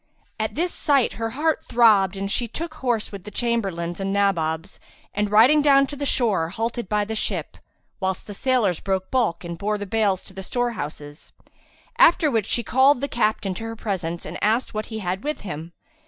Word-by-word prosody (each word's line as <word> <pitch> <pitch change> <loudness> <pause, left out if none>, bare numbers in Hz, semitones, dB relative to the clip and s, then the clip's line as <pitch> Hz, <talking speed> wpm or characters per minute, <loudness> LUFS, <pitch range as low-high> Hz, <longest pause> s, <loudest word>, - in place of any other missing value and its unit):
At 220 0 -2
this 345 +4 -1
sight, 280 -5 +2
her 225 - 0
heart 315 +1 +1
throbbed 205 -5 +4
and 195 +1 -3
she 240 +2 0
took 315 +8 -6
horse 245 -7 -1
with 200 -3 -8
the 210 - -8
Chamberlains 195 -8 -2
and 195 0 -2
Nabobs 185 -3 0 0.3
and, 205 0 0
riding 240 +9 +6
down 275 -1 +5
to 290 - -8
the 285 0 -3
shore, 200 -12 +1
halted 230 +2 -3
by 210 -1 +1
the 220 - -4
ship, 220 - -2 0.4
whilst 190 -1 -2
the 205 - -7
sailors 220 -6 +1
broke 190 -1 -2
bulk 230 -11 +1
and 170 -1 -6
bore 210 +1 0
the 205 - -5
bales 200 -2 +1
to - - -12
the 190 - -7
storehouses; 180 - -4 0.7
after 320 -3 +6
which 225 -4 0
she 235 - 0
called 265 +4 +4
the 280 - -2
captain 215 -6 0
to 205 - -7
her 225 0 -5
presence 175 -6 -3
and 170 - -6
asked 225 +4 +1
what 215 0 -3
he 220 - -6
had 190 -1 -3
with 300 +1 -3
him. 165 -4 -6
215 Hz, 200 wpm, -23 LUFS, 190-245 Hz, 0.7 s, riding